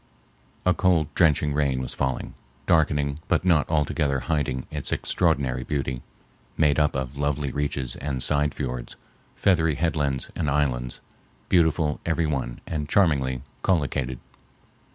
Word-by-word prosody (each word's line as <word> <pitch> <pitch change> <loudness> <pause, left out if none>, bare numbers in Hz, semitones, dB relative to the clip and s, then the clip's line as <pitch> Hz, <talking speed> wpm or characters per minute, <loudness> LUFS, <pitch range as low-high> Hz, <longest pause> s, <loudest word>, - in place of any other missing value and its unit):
A 90 - +5
cold, 90 -6 +2
drenching 75 -3 +3
rain 70 -3 +1
was 65 - -4
falling, 65 -2 -2 0.3
darkening 75 -2 +2
but - - +1
not 85 -5 +3
altogether 75 -3 +1
hiding 70 -5 -1
its - - -3
extraordinary 65 -2 +1
beauty, 65 -3 -2 0.6
made 75 -1 +3
up 75 -1 +2
of 65 0 -3
lovely 70 -1 -1
reaches 70 -3 -2
and 65 -3 -2
side 75 +2 +1
fiords, 60 -3 -4 0.4
feathery 80 -5 +2
headlands 75 -4 -1
and 75 -4 -1
islands, 65 -4 -1 0.5
beautiful 80 -3 +2
every 80 0 0
one 65 -5 -3
and 75 -2 -3
charmingly 70 -10 +2 0.2
collocated. 70 -7 0
70 Hz, 130 wpm, -25 LUFS, 65-80 Hz, 0.6 s, A